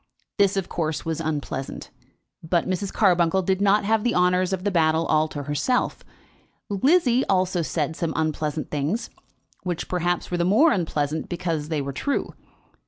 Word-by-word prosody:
This, 200 0 +3
of 190 - -1
course, 160 -2 -3
was 165 0 -2
unpleasant; 145 -4 -4 0.5
but 170 +1 0
Mrs. 190 +1 -2
Carbuncle 180 -2 +3
did 190 +1 0
not 200 0 +3
have 220 0 +2
the 240 - +1
honours 180 +1 +2
of 190 -1 -2
the 205 - 0
battle 160 -2 +2
all 155 0 +2
to 145 -2 -6
herself. 150 - -1 0.7
Lizzie 260 - +3
also 185 -2 +1
said 160 -1 -2
some 165 -1 -2
unpleasant 155 -1 -2
things, 155 +11 -2 0.5
which, 175 -3 -3
perhaps, 175 0 -1
were 175 - 0
the 170 - +1
more 220 - +5
unpleasant 155 -4 -1
because 165 -4 -3
they 155 -3 -1
were 140 0 -5
true. 280 - -1
Mrs. - - -33
175 Hz, 170 wpm, -24 LUFS, 155-195 Hz, 0.7 s, more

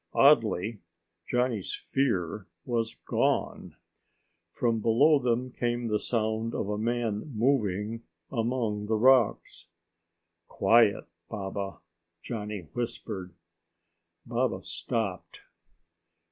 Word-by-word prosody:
Oddly, 115 -6 +4 0.5
Johnny's 125 -5 0
fear 105 -7 -1 0.2
was 115 -2 -1
gone. - - 0 0.8
From 115 +2 0
below 140 +8 +4
them 125 0 0
came 120 -1 -2
the 105 -1 +1
sound 110 0 -1
of 100 - -2
a 105 - -1
man 115 +2 -1
moving 110 -3 +1 0.3
among 115 -4 -1
the 110 - +1
rocks. 125 0 +3 0.8
"Quiet, 105 +1 +4 0.2
Baba," 100 -2 -5 0.4
Johnny 105 -3 -4
whispered. 110 -6 -5 0.9
Baba - - -1
stopped. 105 -6 -3
115 Hz, 90 wpm, -28 LUFS, 105-120 Hz, 0.9 s, Oddly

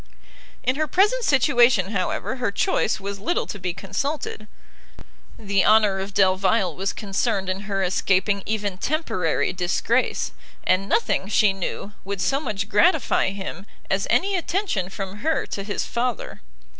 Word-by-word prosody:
In 255 +2 +1
her 310 0 0
present 415 - +2
situation, 245 - +4
however, 200 +6 -2
her 250 -3 0
choice 215 - +1
was 200 0 -5
little 345 - 0
to 205 - -7
be 180 -1 -2
consulted: 215 - -4 0.9
the 200 -2 +1
honour 210 -3 +4
of 195 +1 -6
Delvile 190 -1 +2
was 195 +1 -1
concerned 200 -1 -1
in 185 +1 -1
her 195 -1 0
escaping 190 +2 +1
even 205 -3 -2
temporary 225 - 0
disgrace, 190 +7 0 0.3
and 190 +2 +1
nothing, 195 - +1
she 210 -1 +3
knew, 195 +2 -5
would 200 0 -4
so 225 +10 +1
much 210 -8 -3
gratify 205 -2 +3
him, 195 -1 -7 0.2
as - - +1
any 395 +1 +2
attention 350 - -1
from 195 0 -6
her 315 +8 0
to 200 - -5
his 205 +1 -3
father. 240 -1 -3
200 Hz, 145 wpm, -23 LUFS, 190-245 Hz, 0.9 s, situation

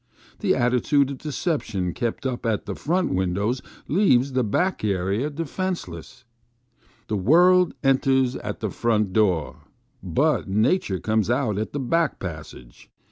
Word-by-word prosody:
The - - +2
attitude 125 +3 +2
of 135 - -7
deception 130 - -2
kept 120 +6 -3
up 130 -2 -2
at 110 -3 -1
the - - -4
front 180 +4 -1
windows 100 +7 -1 0.3
leaves 140 -7 +3
the 130 -1 +2
back 180 - 0
area 100 +6 0
232 160 +3 -4
FROM 185 +6 -3
A - - +1
BACK 180 - -3
WINDOW. 85 - -8
defenceless. 120 +10 -12 0.8
The 105 - -1
world 175 - +4
enters 130 -1 +2
at 105 +2 -6
the 110 -3 -2
front 110 -4 0
door, 95 -8 +1 0.4
but - - 0
nature 105 - +1
comes 110 0 0
out 120 -5 0
at 110 - -3
the 145 - -2
back 155 +4 0
passage. 80 -8 -9
120 Hz, 160 wpm, -24 LUFS, 100-145 Hz, 0.8 s, world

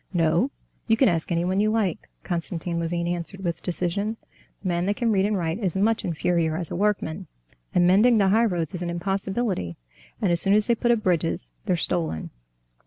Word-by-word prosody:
"No, 170 - +2 0.4
you 225 -1 +3
can 265 - +5
ask 170 -2 0
anyone 175 +3 +1
you 215 +1 +3
like," 215 -6 -1
Konstantin 170 -1 -3
Levin 170 +1 -1
answered 175 +3 -4
with 170 -2 -2
decision, 195 +5 -1 0.5
"the - - -3
man 175 0 0
that 205 - +1
can 235 0 +1
read 195 -1 +3
and 210 -1 0
write 165 +1 -2
is 190 -5 -1
much 220 +3 +2
inferior 165 -1 0
as 170 -2 -4
a - - -2
workman. 195 -3 -1 0.5
And 175 - +5
mending 215 +6 +5
the 195 -2 +4
highroads 195 -6 +1
is 180 - -5
an 175 - -2
impossibility; 195 - -2 0.4
and 195 -5 +1
as 170 -1 +1
soon 195 +1 +4
as 210 0 +4
they 235 - +3
put 240 +1 0
up 235 -3 +3
bridges 165 - 0 0.2
they're - - +3
stolen." 165 - -2
180 Hz, 195 wpm, -25 LUFS, 170-210 Hz, 0.5 s, can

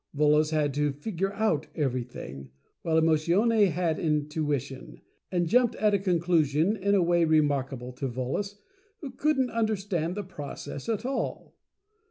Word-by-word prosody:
Volos 150 +1 +3
had 150 -3 0
to 145 +1 +1
"figure 195 +5 -3
out" 200 -9 0
everything* 120 - -4 0.3
while 160 -1 +2
Emotione 180 +7 +3
had 170 -1 -1
Intuition, 150 -3 -2 0.3
and 175 -2 +1
jumped 240 +4 +3
at 210 -1 +2
a 200 - +3
conclusion 170 -1 +2
in 200 0 +1
a 190 - +4
way 170 0 +3
remarkable 140 -5 +1
to 135 +2 -3
Volos, 130 +12 -3 0.5
who 280 -4 -6
couldn't 265 -1 +1
under 220 -1 +1
stand 180 -4 -2
the 205 - -2
process 145 -2 -7
at 225 +1 -1
all. 270 +1 -3
165 Hz, 145 wpm, -27 LUFS, 145-200 Hz, 0.5 s, a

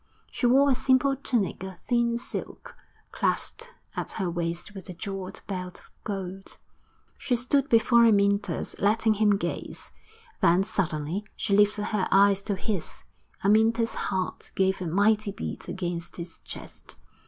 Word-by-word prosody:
She 245 - +1
wore 275 +3 +5
a - - +5
simple 260 +2 +3
tunic 240 -9 -1
of 190 -1 -7
thin 235 +3 +1
silk, 240 - -7 0.4
clasped 465 +1 -2 0.2
at - - -4
her 190 -5 -2
waist 170 +3 -3
with 195 -1 -10
a 180 - -7
jewelled 195 0 -6
belt 180 -2 -5
of - - -22
gold. 195 -1 -6 0.6
She 270 -3 0
stood 270 +4 +1
before 235 0 +5
Amyntas, 200 -1 +1
letting 220 +2 +3
him 210 -1 +3
gaze; - - -5 0.5
then 175 +3 +5
suddenly 170 -1 -2
she 200 - 0
lifted 205 0 +3
her 205 -3 +1
eyes 200 0 +5
to 205 - 0
his. 190 -3 -3 0.4
Amyntas's 225 +3 +3
heart 190 -2 -3
gave 190 0 +1
a 180 - -2
mighty 205 +4 +2
beat 200 - -6
against 175 -2 -4
his 170 -1 -8
chest. - - -10
200 Hz, 145 wpm, -27 LUFS, 185-230 Hz, 0.6 s, wore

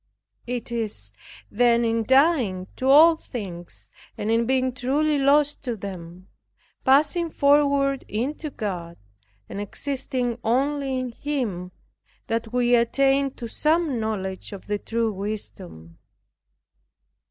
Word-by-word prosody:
It 245 -1 -4
is, 210 - -3 0.4
then, 235 +1 +3
in 230 0 +1
dying 260 - +3
to 260 - -2
all 320 +4 +8
things, 190 - -8 0.3
and 210 +1 -2
in 230 0 +2
being 260 -1 +1
truly 285 +4 +1
lost 290 +2 +3
to 240 -2 -2
them, 185 -3 -9 0.6
passing 300 +5 +3
forward 280 -2 +3
into 280 +8 -3
God, 180 -9 -5 0.5
and 200 - -5
existing 255 +1 -3
only 270 +3 0
in 255 -1 -3
Him, 230 -10 -3 0.5
that 225 0 -2
we 245 0 +2
attain 270 +3 +3
to 235 - -6
some 305 +1 +1
knowledge 190 -4 -4
of 195 - -9
the 205 0 -2
true 230 0 -1
wisdom. 190 - -7
245 Hz, 120 wpm, -24 LUFS, 210-275 Hz, 0.6 s, all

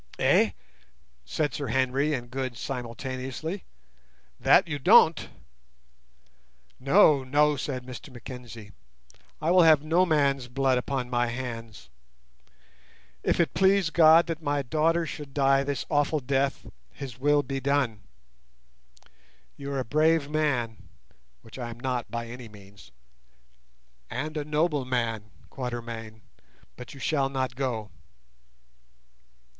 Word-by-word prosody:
"Eh?" - - +3 0.7
said 150 - -1
Sir 140 - -4
Henry 130 +3 +1
and 120 -4 -4
Good 130 -2 -4
simultaneously. 130 - -5 0.7
"That 185 - +5
you 145 -3 -3
don't." 160 +4 +5 1.5
"No, 140 0 +5
no," 150 +3 +3
said 130 -2 -4
Mr 130 -1 -9
Mackenzie. 120 -3 -10 0.7
"I 160 +2 0
will 180 0 +6
have 155 -3 +6
no 170 +4 +2
man's 140 -5 +1
blood 130 0 +1
upon 130 -1 -3
my 120 0 +1
hands. 115 - -7 1.3
If - - 0
it 165 -5 +2
please 190 -3 +3
God 165 0 +6
that 165 -1 -4
my 145 -2 -1
daughter 165 +5 +1
should 145 -3 -8
die 135 -1 +3
this 140 -2 -3
awful 145 +1 +1
death, 135 +1 -1 0.2
His 125 - -9
will 145 +1 +3
be 135 0 -4
done. 135 -6 0 1.5
You 140 0 -7
are 135 - -1
a 130 - -3
brave 155 +3 +2
man 130 -8 0 0.7
(which 115 +3 -12
I 120 -1 -4
am 120 0 -9
not 125 -2 -3
by 115 0 -4
any 120 0 -9
means) 100 -6 -16 1.2
and 155 +2 -4
a 150 - -2
noble 150 -1 0
man, 115 -4 -2 0.2
Quatermain, 115 -4 -6 0.5
but 125 +2 -10
you - - -12
shall 140 -1 0
not 130 -2 -2
go." 120 -6 -3
135 Hz, 125 wpm, -27 LUFS, 120-150 Hz, 1.5 s, will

